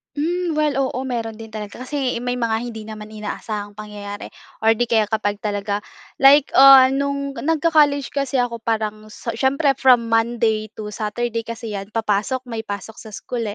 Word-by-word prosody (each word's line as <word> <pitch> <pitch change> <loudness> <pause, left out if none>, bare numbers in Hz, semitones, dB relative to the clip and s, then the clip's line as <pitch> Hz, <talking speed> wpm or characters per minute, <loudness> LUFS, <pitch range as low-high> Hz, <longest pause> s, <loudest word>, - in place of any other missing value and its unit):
Mm, 340 +3 -1
well, 300 -2 +1
oo, 260 -2 -1
meron 230 -2 -3
din 225 - -9
talaga. 215 +2 -8
Kasi 255 -3 -2
may 245 0 -2
mga 225 -2 0
hindi 220 -2 -8
naman 215 -1 -8
inaasahang 210 -1 -5
pangyayari 205 -1 -8 0.3
or 225 0 +4
'di 240 - +1
kaya 220 -3 +1
kapag 205 -2 -1
talaga, 205 0 -2 0.4
like, 275 +1 +6
ah, 270 -1 +9
noong 280 0 -2
nag-co-college 300 -3 +2
kasi 275 -2 -1
ako 235 -2 -1
parang, 215 -1 -2
so 230 +2 -6
siyempre 275 +4 +2
from 255 -3 +4
Monday 225 -1 +1
to 210 -1 -6
Saturday 230 +2 -2
kasi 230 -1 -7
'yan 195 0 -5
papasok, 225 +4 -1
may 230 -2 -4
pasok 205 0 -6
sa 220 - -10
school 235 +3 -5
230 Hz, 170 wpm, -21 LUFS, 215-265 Hz, 0.4 s, ah